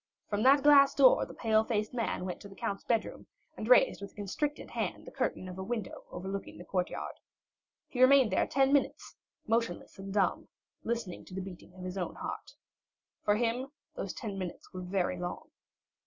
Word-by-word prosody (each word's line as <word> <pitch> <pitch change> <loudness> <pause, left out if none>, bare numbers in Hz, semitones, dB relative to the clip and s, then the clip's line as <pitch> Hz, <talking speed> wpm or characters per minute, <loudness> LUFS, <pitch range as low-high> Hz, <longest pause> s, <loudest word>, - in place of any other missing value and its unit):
From 205 0 -1
that 270 +3 +6
glass 285 -1 +7
door - - +6
the - - -10
pale 220 -1 +3
faced 215 -1 -1
man 230 -6 -1
went 180 - -5
to 200 - -10
the 195 - -13
count's 200 -4 -3
bedroom 230 -2 -1 0.3
and 215 - -5
raised 250 -4 +5
with 200 - -8
a - - -33
constricted 285 +9 -3
hand - - -3
the - - -9
curtain 185 - -2
of 180 0 -7
a - - -3
window 220 -2 -4
overlooking 190 +2 -5
the - - -10
courtyard. 180 -2 -2 0.7
He 255 -5 -3
remained 260 -3 +7
there - - +2
ten 270 0 +3
minutes, 285 - 0 0.3
motionless 225 -5 -1
and 195 0 -6
dumb, 200 -1 +1 0.4
listening 230 -6 -3
to 185 - -10
the 190 - -2
beating 180 -1 -10
of 185 - -9
his 185 +1 -4
own 180 - -3
heart. - - -6 0.7
For 205 - +3
him 240 +3 0 0.3
those - - -4
ten 205 -5 -5
minutes 180 -2 -7
were 185 - -5
very 180 -1 -1
long. 175 0 -5
210 Hz, 190 wpm, -31 LUFS, 190-245 Hz, 0.7 s, glass